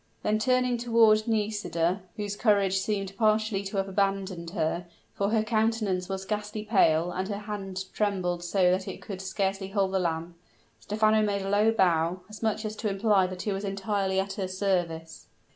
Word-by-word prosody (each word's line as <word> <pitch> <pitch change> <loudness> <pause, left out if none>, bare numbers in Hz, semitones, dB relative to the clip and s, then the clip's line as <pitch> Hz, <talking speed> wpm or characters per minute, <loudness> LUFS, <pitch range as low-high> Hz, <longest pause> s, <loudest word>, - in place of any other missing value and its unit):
Then 215 0 +1
turning 250 0 +2
toward 225 -2 +4
Nisida, 205 -5 0 0.2
whose 205 -1 -3
courage 200 -3 +3
seemed 195 -1 -2
partially 215 -2 +2
to 195 +1 -4
have 195 0 0
abandoned 195 -3 -1
her, 170 0 -2 0.3
for 200 0 0
her 220 0 +2
countenance 215 -4 0
was 190 0 -4
ghastly 210 +1 -3
pale, 175 -6 +3
and 185 +1 -3
her 200 -1 -3
hand 195 -3 -5
trembled 185 -4 -1
so 180 +1 +3
that 185 +1 -1
it - - -6
could 190 -2 -6
scarcely 195 0 -2
hold 195 -1 0
the 190 - +1
lamp, 170 -1 -2 0.4
Stephano 215 +1 +2
made 200 -2 0
a 195 - -3
low 205 +2 +4
bow, 175 -3 +2
as 215 - -10
much 220 0 -1
as 215 0 -4
to 215 - -1
imply 195 -1 +3
that 185 0 -6
he 210 - -1
was 195 +1 -3
entirely 195 -1 -1
at 195 0 -2
her 190 -2 -3
service. 175 -4 -2
195 Hz, 180 wpm, -28 LUFS, 185-215 Hz, 0.4 s, toward